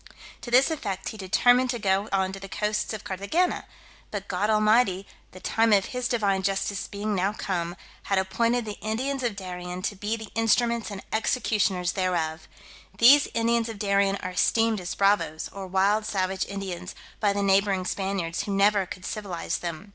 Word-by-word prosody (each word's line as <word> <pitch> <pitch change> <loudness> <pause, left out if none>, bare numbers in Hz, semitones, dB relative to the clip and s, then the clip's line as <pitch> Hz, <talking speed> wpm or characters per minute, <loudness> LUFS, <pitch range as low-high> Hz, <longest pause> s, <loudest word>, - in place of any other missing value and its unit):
To - - -7
this 260 +6 +5
effect 200 - -3
he - - -8
determined 245 +6 +3
to 245 - -1
go 200 -1 0
on 190 -1 +1
to 195 - -7
the 195 0 -9
coasts 210 +1 -1
of 220 - -5
Carthagena; 200 - -1 0.4
but 200 -2 -5
God 200 +3 -1
Almighty, 215 -2 +3 0.3
the 185 - -12
time 225 +4 +2
of 200 -2 +4
His 250 0 -1
Divine 200 -6 +1
justice 195 +1 -1
being 205 +1 -3
now 195 +1 +1
come, 175 -5 -3 0.3
had 195 - +1
appointed 230 +5 +1
the 210 -1 -6
Indians 260 +6 -2
of 240 -5 -1
Darien 180 -1 -6
to 205 - -2
be 210 +3 -2
the 220 -1 -9
instruments 230 +1 +1
and 200 -2 -7
executioners 210 -5 +1
thereof. 170 -4 -1 0.5
These 275 +6 +7
Indians 230 0 +1
of 225 - -6
Darien 200 -1 +2
are 185 - -3
esteemed 225 +3 +2
as 175 - -5
bravoes, 195 -6 +1
or 195 -1 -6
wild 200 +3 +2
savage 190 -1 -1
Indians, 190 -2 -6 0.2
by 205 -2 +2
the 200 0 -1
neighbouring 195 -1 +2
Spaniards, 190 -4 -2
who 200 - -2
never 200 -1 +3
could 185 +1 -8
civilize 200 -6 -3
them. 170 +3 -6
200 Hz, 180 wpm, -26 LUFS, 190-220 Hz, 0.5 s, These